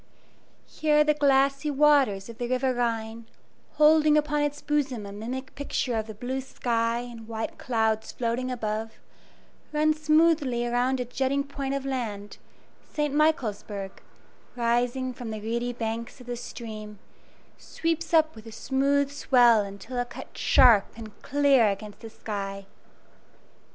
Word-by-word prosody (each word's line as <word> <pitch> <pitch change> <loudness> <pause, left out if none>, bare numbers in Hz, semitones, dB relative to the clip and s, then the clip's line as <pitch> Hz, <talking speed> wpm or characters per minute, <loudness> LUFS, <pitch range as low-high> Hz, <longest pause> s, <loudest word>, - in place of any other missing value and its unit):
Here 300 -1 +2
the 300 0 +3
glassy 275 0 +2
waters 275 -9 +3
of 230 -1 -11
the 240 - -2
River 255 +1 +1
Rhine, 230 -2 -2 0.5
holding 305 0 +5
upon 295 0 +1
its 290 0 -1
bosom 275 -8 -1
a 200 - -8
mimic 250 +6 -6
picture 275 -3 -2
of 220 -1 -2
the 220 - -8
blue 255 +4 -3
sky 235 -2 -1
and 235 -2 -10
white 225 -1 -5
clouds 220 -2 0
floating 245 +1 -2
above, 220 -2 -3 0.8
runs 305 0 +1
smoothly 305 -6 +3
around 245 +2 0
a 250 - -2
jutting 270 +3 -1
point 275 -1 -4
of 275 -1 -4
land, 220 -7 -4 0.5
St. 295 -2 -1
Michaelsburg, 215 -10 -1 0.5
rising 245 +2 0
from 245 -2 -7
the 215 -1 -5
reedy 235 +3 -2
banks 230 +1 -5
of 250 - -12
the 245 0 -4
stream, 215 -3 -8 0.6
sweeps 330 0 -3
up 315 -1 +4
with 220 0 -12
a - - -9
smooth 275 +4 0
swell 245 -5 +4
until 200 +5 -6
it 245 0 -2
cuts - - -9
sharp 235 -6 +6
and 220 -2 -11
clear 280 -5 +3
against 205 +1 -6
the 225 - -9
sky. 195 -2 -6
245 Hz, 145 wpm, -26 LUFS, 225-280 Hz, 0.8 s, sharp